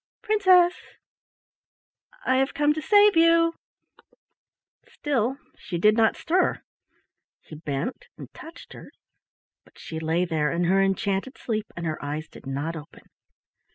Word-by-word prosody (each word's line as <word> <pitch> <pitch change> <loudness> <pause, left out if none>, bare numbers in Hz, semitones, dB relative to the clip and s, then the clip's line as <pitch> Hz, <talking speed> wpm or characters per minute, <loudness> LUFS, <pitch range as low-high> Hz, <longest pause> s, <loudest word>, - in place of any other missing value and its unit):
Princess! 370 -4 +4 1.5
I 260 - +2
have 270 +1 0
come 295 0 +2
to 310 - -5
save 410 +2 +5
you." 330 0 +4 1.3
Still 265 -3 -2 0.2
she 180 -4 -6
did 210 +5 +4
not 225 -1 +3
stir. 365 +3 0 0.8
He 155 - -11
bent 155 - -5
and - - -11
touched 330 +1 -12
her, - - -12 0.7
but - - -24
she 160 - -7
lay 165 +3 0
there 155 -3 -1
in 170 +1 -1
her 190 +3 +3
enchanted 195 +5 -1
sleep, 215 -2 -3
and 170 - -4
her 155 -2 -4
eyes 150 +2 -4
did - - -14
not 145 +5 -3
open. 155 0 -12
215 Hz, 135 wpm, -25 LUFS, -, 1.5 s, save